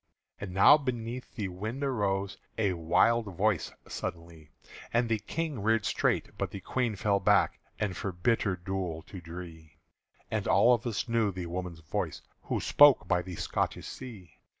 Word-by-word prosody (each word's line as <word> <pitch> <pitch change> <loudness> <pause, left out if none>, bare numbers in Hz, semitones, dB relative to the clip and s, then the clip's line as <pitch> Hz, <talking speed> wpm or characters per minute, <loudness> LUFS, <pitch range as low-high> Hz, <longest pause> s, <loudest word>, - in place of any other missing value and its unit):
And 100 -2 -6
now 100 +11 +7
beneath 125 -2 -4
the 100 -4 -3
window 110 +10 -4
arose 100 -6 -1 0.2
A 100 -4 +2
wild 100 +8 +3
voice 100 -2 +1 0.2
suddenly: 85 -3 -7 0.4
And 120 0 +2
the 110 -1 +1
King 150 +5 -3
reared 110 0 +2
straight, - - 0
but - - -1
the 100 - -7
Queen 120 +3 -1
fell 100 0 +1
back 100 +1 +3 0.2
As 100 -4 -1
for 100 - -3
bitter 95 +2 +1
dule 90 -3 -4
to 95 - -10
dree; 80 -2 -10 0.5
And - - -1
all 125 - +6
of 120 +1 -1
us 115 +1 -2
knew 115 -3 +2
the 90 -1 -5
woman's 85 -1 -5
voice 75 - -3 0.2
Who - - -2
spoke 145 -2 +6
by 90 -1 +2
the 90 0 -7
Scotish - - -2
Sea. 110 -10 -10
100 Hz, 165 wpm, -30 LUFS, 90-115 Hz, 0.5 s, now